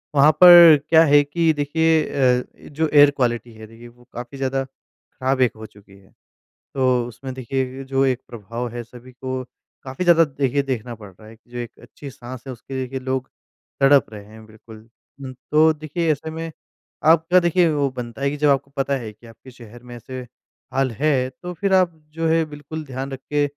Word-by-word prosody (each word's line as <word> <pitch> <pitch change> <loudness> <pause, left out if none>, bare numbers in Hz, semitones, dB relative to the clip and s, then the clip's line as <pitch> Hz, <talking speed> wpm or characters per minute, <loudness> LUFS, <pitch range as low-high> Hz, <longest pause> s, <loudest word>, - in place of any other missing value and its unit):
वहाँ 145 +2 +6
पर 175 -3 +10
क्या 160 0 +6
है 145 -1 +5
कि 160 +3 +1
देखिए 160 +2 +1
अ, 125 -2 +2
ए - - -15
जो 155 +2 -1
एयर 145 0 +7
क्वालिटी 120 -2 -1
है 110 0 -12
देखिए 115 +2 -14
वो 120 +1 -20
काफ़ी 120 +3 -8
ज़्यादा 135 0 -1
ख़राब 130 0 -6
एक 125 - +3
हो 110 0 -10
चुकी 100 -2 -18
है। 95 -1 -23 0.6
तो, 130 -3 +1
उसमें 130 +3 -9
देखिए 130 +1 -3
ये 135 - -7
जो 135 0 0
एक 130 -1 -1
प्रभाव 115 +2 -6
है 120 +1 -7
सभी 125 +2 -15
को 130 0 -5 0.4
काफ़ी 130 +6 -5
ज़्यादा 170 -2 +5
देखिए 140 -1 -1
देखना 125 -3 -4
पड़ 105 -2 -13
रहा 110 +4 -18
है, 110 - -13
एक 110 - -21
जो 120 0 -10
एक 120 -1 -5
अच्छी 140 - -11
साँस 125 -1 -10
है 130 - -5
उसके 120 +3 -12
देखिए 130 +1 -6
लोग 130 0 -3 0.5
तड़प 140 0 +5
रहे 105 -1 -10
हैं 110 +1 -15
बिल्कुल। 110 +1 -15 0.4
उम, 130 -1 -7 0.2
तो 155 +1 +5
देखिए 155 +2 -2
ऐसे 155 +2 -4
में 165 0 -6 0.5
आपका 165 +3 +5
देखिए 175 0 +2
वो 145 -2 0
बनता 120 +1 -7
है 140 - +1
कि 145 - -5
जब 150 0 +2
आपको 140 0 0
पता 140 0 -1
है 115 -4 -7
कि 115 +3 -18
आपके 115 +3 -15
शहर 120 -1 -15
में 120 0 -11
ऐसे 130 +2 -8 0.5
हाल 135 -1 0
है, 130 0 0
तो 175 +8 -9
फिर 195 +3 -1
आप 185 -2 +3 0.2
जो 165 0 -2
है 160 0 +2
बिल्कुल 150 +1 -8
ध्यान 135 0 -6
रख 135 - -6
के 145 0 +2
135 Hz, 210 wpm, -21 LUFS, 120-150 Hz, 0.6 s, पर